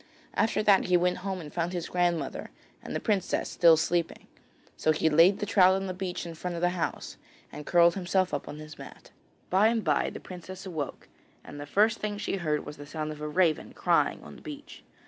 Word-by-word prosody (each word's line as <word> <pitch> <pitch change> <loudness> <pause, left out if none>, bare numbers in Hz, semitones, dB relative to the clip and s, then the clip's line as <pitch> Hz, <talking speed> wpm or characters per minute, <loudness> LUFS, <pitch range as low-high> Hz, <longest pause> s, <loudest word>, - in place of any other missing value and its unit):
After 220 -1 +1
that 200 -2 +5
he 180 -1 +4
went 180 +1 +1
home 190 0 -4
and 150 -4 -9
found 175 +1 -2
his 175 -2 -3
grandmother 175 -2 -1 0.3
and - - -7
the - - 0
princess 205 -5 -1
still 165 -2 +5
sleeping, 170 +1 -1 0.5
so 155 - +2
he 160 +1 +1
laid 170 +6 +6
the - - -3
trout 190 -2 +5
on 195 0 -2
the 185 - -3
beach 180 -1 -4
in 170 - -6
front 175 +2 -5
of 170 - -4
the 175 - +4
house 175 -2 -4 0.3
and 150 - -9
curled 170 -1 +5
himself 185 0 0
up - - -3
on 150 - -7
his 155 -1 -11
mat. - - -12 0.4
By 195 +4 +5
and 225 -1 +1
bye - - +1
the - - -8
princess 185 +1 -9
awoke, 160 -7 -5 0.4
and 145 - -10
the 145 - -7
first 215 +8 +2
thing 210 -1 -3
she 205 -1 -2
heard 155 -4 -1
was 150 - -8
the 145 0 -10
sound 155 0 -4
of 150 0 -9
a 150 - -3
raven 160 0 +1
crying - - +1
on - - -11
the - - -14
beach. 290 -1 -10
175 Hz, 225 wpm, -28 LUFS, 160-190 Hz, 0.5 s, laid